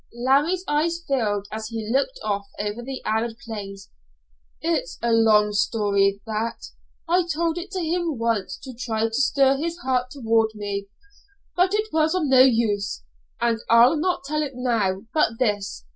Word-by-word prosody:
Larry's 280 +9 +2
eyes 320 +3 +1
filled 210 -7 0
as 220 0 -5
he 225 -1 -5
looked - - 0
off 200 -1 -2
over 210 +3 -3
the 265 +2 -7
arid 225 +1 -1
plains. 200 -4 -8 0.7
"It's 335 +10 -2
a 235 - 0
long 215 -2 +4
story 200 -1 +1
that. 225 +1 -2 0.5
I 350 +1 +2
told 330 +2 0
it 360 +3 -8
to 375 - -2
him 335 -3 -1
once 225 -5 -1
to 260 -2 -8
try 225 -2 -2
to 225 - -10
stir 270 +2 +3
his 335 +3 -3
heart 255 -6 0
toward 225 -4 +1
me, 200 -1 -4 0.7
but 370 +3 +3
it 425 -2 -2
was 315 +2 +2
of 365 - +1
no 265 -2 +6
use, 220 - +2 0.4
and 235 -1 +1
I'll 235 +6 +6
not 350 0 -1
tell 305 +2 -2
it 285 -3 -3
now 220 -7 0
but 265 -8 +2
this. 205 - -1
235 Hz, 165 wpm, -23 LUFS, 215-305 Hz, 0.7 s, no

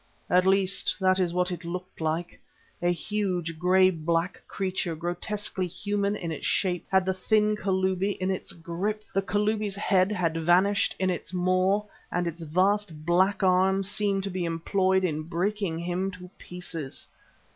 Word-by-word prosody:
At 180 +1 +4
least, 195 0 +2
that 185 0 +3
is 180 -2 +1
what 180 +1 0
it 175 0 -5
looked 180 +1 -6
like. 160 +2 -2 0.4
A 175 0 +3
huge, 175 -4 -2
grey 185 +2 +5
black 165 +1 -1
creature, 185 -3 -2
grotesquely 185 +3 -2
human 205 +3 -1
in 170 -5 -4
its 155 - -3
shape, 180 -3 0
had 190 -1 +3
the 190 - +1
thin 210 +3 +2
Kalubi 190 0 0
in 185 +1 0
its 190 - -2
grip. 180 +6 -3
The 195 - +2
Kalubi's 210 0 0
head 195 -1 +2
had 170 -5 0
vanished 180 +5 +3
in 185 0 +1
its 175 0 -5
maw 185 +3 +2 0.3
and 175 0 0
its 170 0 -4
vast 180 0 0
black 190 +3 +2
arms 190 +1 +3
seemed 200 -2 0
to 195 - -3
be 180 -1 -2
employed 190 +3 +1
in 155 -4 0
breaking 175 +2 -1
him 175 +3 -2
to 180 -1 -11
pieces. 165 -5 -7
185 Hz, 160 wpm, -27 LUFS, 175-195 Hz, 0.4 s, grey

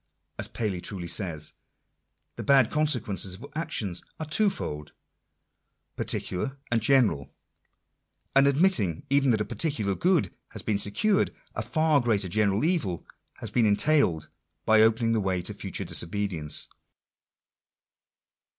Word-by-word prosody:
As - - 0
Paley 100 -6 -3
truly 90 -3 -5
says, 85 -4 -4 0.8
"the - - -6
bad 135 -4 +4
consequences 110 - 0
of - - -11
actions 105 - -2 0.2
are 160 - -3
twofold, 150 - -1 1.0
particular 135 +10 -3
and 115 -1 +2
general 110 - +2 1.0
And 135 +1 +6
admitting 140 - +2
even 140 -1 +3
that 110 -3 +2
a - - -1
particular 115 -12 -2
good 170 - +1 0.2
has - - -6
been 105 -2 0
secured, 195 - +1 0.2
a - - -3
far 150 +5 +2
greater 105 -6 0
general 105 - +1
evil 155 - -1 0.4
has - - -5
been 120 -3 +3
entailed 100 - +2 0.4
by 110 0 +5
opening 115 +1 +3
the 110 - +1
way 95 -2 0
to - - -5
future - - -5
disobedience. 85 -4 0
110 Hz, 125 wpm, -27 LUFS, 95-140 Hz, 1.0 s, And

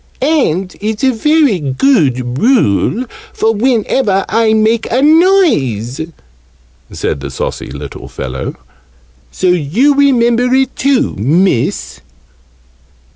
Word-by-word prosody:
"And 195 - 0
it's 215 +3 -3
a 265 - +4
very 290 - +2
good 135 - 0
rule 240 - +1 0.3
for 225 +1 0
whenever 220 -3 0
I 225 +1 +1
make 220 +1 +1
a 245 - +1
noise," 280 - +2 0.9
said - - -3
the 70 0 -6
saucy 65 - -5
little 70 +1 -9
fellow. 65 0 -6 0.8
"So 185 - -1
you 180 - +2
remember 250 -3 +2
it 265 0 0
too, 275 0 +1
Miss!" 150 - 0
220 Hz, 105 wpm, -13 LUFS, -, 0.9 s, a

